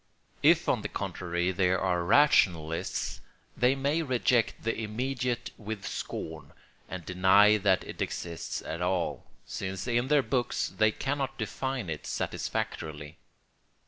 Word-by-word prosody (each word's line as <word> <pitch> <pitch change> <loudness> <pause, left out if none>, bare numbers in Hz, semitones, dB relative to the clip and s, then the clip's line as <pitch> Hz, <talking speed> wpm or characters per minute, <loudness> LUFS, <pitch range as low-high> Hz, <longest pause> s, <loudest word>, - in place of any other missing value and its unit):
If - - +5
on - - +2
the - - -4
contrary 90 0 -2
they 90 0 +2
are 90 -1 +1
rationalists 85 - +2 0.3
they 125 +2 +3
may 140 +4 +1
reject 125 -4 +1
the 115 - 0
immediate 120 +3 -2
with 105 -2 -5
scorn 80 -4 -5 0.4
and 95 -3 -6
deny 95 +3 +5
that 95 -2 +2
it - - -8
exists 85 -2 -4
at 80 +2 -5
all, 90 -1 -1 0.2
since 95 -1 -4
in 120 +1 +1
their 145 -1 +4
books 125 -3 0
they 110 - +3
cannot 135 +1 -2
define 125 0 -3
it 80 -2 -5
satisfactorily. 75 0 -4
105 Hz, 130 wpm, -29 LUFS, 90-125 Hz, 0.4 s, If